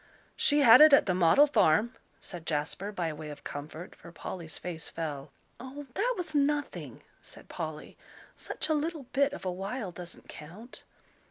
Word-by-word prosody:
"She 295 0 +3
had 250 0 +9
it 305 -1 +9
at 280 - +7
the 185 - +1
'Model 180 - +6
Farm,'" 235 - +3 0.3
said 175 -3 -8
Jasper, 160 +6 -2
by 170 -6 -2
way 150 0 -8
of 145 -1 -10
comfort, 155 +4 -7
for 170 - -13
Polly's 165 -1 -7
face 170 -2 -6
fell. 150 -4 -5 0.3
"Oh, 265 +4 -8
that - - 0
was 355 -3 -4
nothing," 290 0 -1 0.2
said - - -13
Polly, - - -6 0.4
"such - - -4
a 315 - +2
little 310 0 -2
bit 280 +1 +3
of 290 - -8
a 185 - 0
while 195 +3 -4
doesn't 175 0 -9
count." 190 +11 -10
195 Hz, 170 wpm, -29 LUFS, -, 0.4 s, had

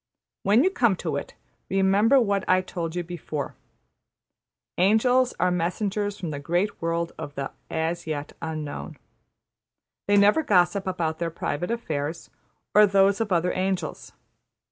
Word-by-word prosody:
'' - - -66
When 215 +6 +5
you 375 - +3
come 235 - +2
to 160 -4 -3
it, 140 - -5 0.3
remember 195 +7 +4
what 200 -5 +1
I 185 0 +5
told 170 -3 -5
you 175 - -1
before 160 -4 -5 1.3
Angels 245 +6 +3
are 180 +1 +2
messengers 200 +4 -1
from 170 -4 -4
the 145 - -4
great 175 +7 -1
world 165 0 -1
of 145 - -7
the 140 -1 -4 0.2
``As 165 +1 -2
Yet 150 -2 -4
Unknown.'' 155 -2 -5 1.1
They 205 0 +4
never 205 +9 +5
gossip 195 - +2
about 165 -4 -2
their 170 -1 -1
private 165 0 -3
affairs, 160 -8 -3 0.4
or 210 0 +7
those 195 +1 +3
of 215 -3 -2
other 180 0 +2
angels. 190 0 -3
180 Hz, 145 wpm, -25 LUFS, 165-205 Hz, 1.3 s, or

